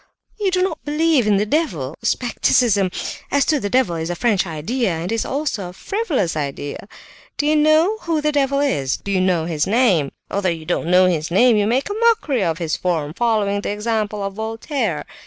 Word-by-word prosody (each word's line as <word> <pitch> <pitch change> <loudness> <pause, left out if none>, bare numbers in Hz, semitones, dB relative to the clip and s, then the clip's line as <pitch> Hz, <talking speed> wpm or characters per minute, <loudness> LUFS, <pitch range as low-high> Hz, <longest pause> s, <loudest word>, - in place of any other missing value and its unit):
You 405 -2 +1
do 365 0 +1
not 340 -4 -3
believe 300 -4 +2
in 205 -2 +4
the 205 - +1
devil? 180 - -1
Scepticism 230 -4 +2 0.4
as 280 0 +2
to 305 -2 +2
the 205 - -3
devil 240 -8 +1
is 160 +1 -3
a 175 - -2
French 195 0 +1
idea, 195 - -2
and 165 +4 -4
it - - +1
is 225 - -1
also 265 -10 -3
a - - -11
frivolous 305 - -2
idea. 145 +3 -5 0.5
Do 290 - 0
you 305 +1 +3
know 310 +8 +3
who 330 -5 -1
the 300 0 0
devil 280 -1 +1
is? 140 - 0
Do 200 - -6
you 190 -1 +2
know 180 -3 +1
his 160 -3 -1
name? 195 - +2 0.2
Although 200 -2 0
you 165 -2 -4
don't 170 -1 -1
know 180 +1 +5
his 165 -4 0
name 235 +7 +4
you 205 -1 +2
make 255 +5 +1
a 410 - -3
mockery 420 - +2
of 165 -3 0
his 165 -3 -2
form, 160 -5 -2
following 210 -2 0
the - - -4
example 210 -1 -2
of 195 0 -3
Voltaire. 220 - -3
215 Hz, 210 wpm, -20 LUFS, 175-280 Hz, 0.5 s, know